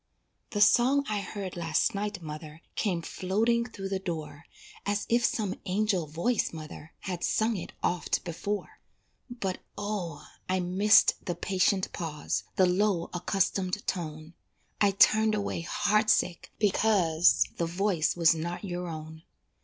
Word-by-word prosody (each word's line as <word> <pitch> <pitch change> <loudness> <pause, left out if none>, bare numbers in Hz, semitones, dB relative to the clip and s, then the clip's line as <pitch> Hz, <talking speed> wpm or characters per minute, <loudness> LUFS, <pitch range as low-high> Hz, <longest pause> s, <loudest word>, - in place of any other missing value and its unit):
The 205 -3 -2
song 255 +6 +5
I 210 -1 -1
heard 195 -2 -6
last 165 -2 +1
night, 205 -2 -3
mother, 155 +1 -8
Came 175 -5 -1
floating 225 +8 0
through 195 -4 -6
the 195 -1 -1
door 160 -4 -6 0.4
As 205 0 -1
if 235 +1 +3
some 210 -4 0
angel 190 -3 0
voice, 170 +10 0
mother, 155 -1 -10
Had 180 -3 -4
sung 220 +1 +1
it 185 - -6
oft 175 0 0
before; 200 +4 -4 0.5
But, 200 -7 -3 0.2
O! 200 -7 -4 0.2
I 185 0 +2
missed 190 +4 +4
the 175 - -2
patient 190 0 +1
pause, 160 -3 -3
The 185 - +5
low 180 -1 +1
accustomed 185 +2 -1
tone, 155 -2 -4 0.5
I 205 - +6
turned 215 +2 +4
away 205 -4 -2
heart 210 +5 +1
sick 175 - +1
because 190 -5 +3
The 170 - 0
voice 175 -2 +1
was 165 -1 +5
not 170 +3 -4
your 180 -2 -4
own. 160 -1 -7
185 Hz, 140 wpm, -29 LUFS, 170-210 Hz, 0.5 s, I